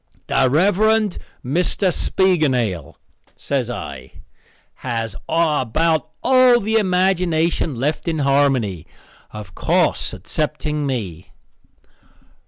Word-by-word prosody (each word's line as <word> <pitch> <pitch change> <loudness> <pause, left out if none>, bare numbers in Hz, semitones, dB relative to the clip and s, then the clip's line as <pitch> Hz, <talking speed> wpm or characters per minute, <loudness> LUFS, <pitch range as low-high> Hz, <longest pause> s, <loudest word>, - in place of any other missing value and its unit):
"The 135 -1 +2
Rev. 180 +8 +2 0.7
Mr. 180 +6 0
Spiegelnail," 130 - 0 0.4
says - - -2
I, - - -7 0.6
"has 115 -4 -4
about 160 -1 +1
all 255 -2 +5
the 220 +1 0
imagination 180 -6 +1
left 145 +8 -2
in 165 -1 -1
Harmony 135 - +1 0.4
of 105 -5 -10
course - - 0
excepting 150 -1 -3
me." 95 -9 -4
150 Hz, 85 wpm, -20 LUFS, 125-180 Hz, 0.7 s, all